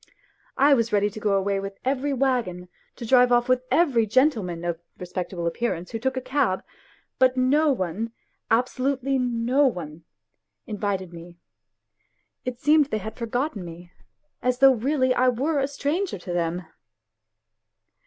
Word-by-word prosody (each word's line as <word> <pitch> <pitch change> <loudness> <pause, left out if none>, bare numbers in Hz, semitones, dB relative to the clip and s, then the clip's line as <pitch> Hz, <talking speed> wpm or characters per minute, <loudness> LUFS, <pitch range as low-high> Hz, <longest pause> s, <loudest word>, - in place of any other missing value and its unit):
I 280 +2 +5
was 230 -3 +1
ready 205 0 +2
to 215 - -8
go 210 -2 +1
away 195 0 0
with 195 0 -6
every 275 +2 0
waggon, 240 -10 -1 0.3
to 235 - -7
drive 250 +1 +5
off 240 0 +3
with 255 0 +2
every 265 -10 +3
gentleman 210 - +1
of 170 -1 -3 0.2
respectable 180 -1 -5
appearance 170 0 -2
who 225 - -4
took 265 +2 -1
a - - -1
cab; 255 -7 0 0.6
but 260 0 +4
no 290 +4 +3
one 215 0 -2 0.4
abso 245 +3 +1
lutely 270 0 0
no 250 +3 +2
one 165 - -5 0.6
invited 200 -4 -3
me; 170 +1 -11 1.1
it 250 -1 -4
seemed 300 +1 +4
they 220 - -2
had 215 +1 -7
forgotten 245 - -3
me, 175 +1 -11 0.5
as 250 0 +1
though 270 0 +7
really 260 +2 +1
I 255 0 +3
were 280 +5 0
a 270 - +1
stranger 290 - -2
to 175 0 -6
them 175 +1 -2
240 Hz, 155 wpm, -24 LUFS, 190-265 Hz, 1.1 s, though